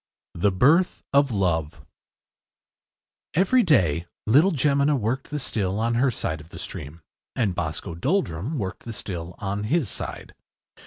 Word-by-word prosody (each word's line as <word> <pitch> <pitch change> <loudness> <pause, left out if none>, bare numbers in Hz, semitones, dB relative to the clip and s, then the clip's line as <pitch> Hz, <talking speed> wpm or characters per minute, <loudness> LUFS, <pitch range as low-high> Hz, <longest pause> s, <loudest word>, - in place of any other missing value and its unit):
THE 100 +4 +2
BIRTH 150 - +3
OF 140 0 +5
LOVE 80 - -1 1.5
Every 195 +9 +4
day 90 - +2 0.2
little 150 - +5
Jemina 145 0 +2
worked 125 +4 -2
the 150 - -3
still 100 -8 -2
on 115 +1 +1
her 125 +4 +3
side 80 -9 -3
of 80 - -16
the - - -10
stream, 75 +3 -7 0.3
and 110 -7 +1
Boscoe 80 -1 -4
Doldrum 130 - -1
worked 95 -6 -4
the 115 - -7
still 90 -4 -6
on 100 +1 -3
his 145 - +1
side. - - -6
105 Hz, 145 wpm, -25 LUFS, 85-140 Hz, 1.5 s, OF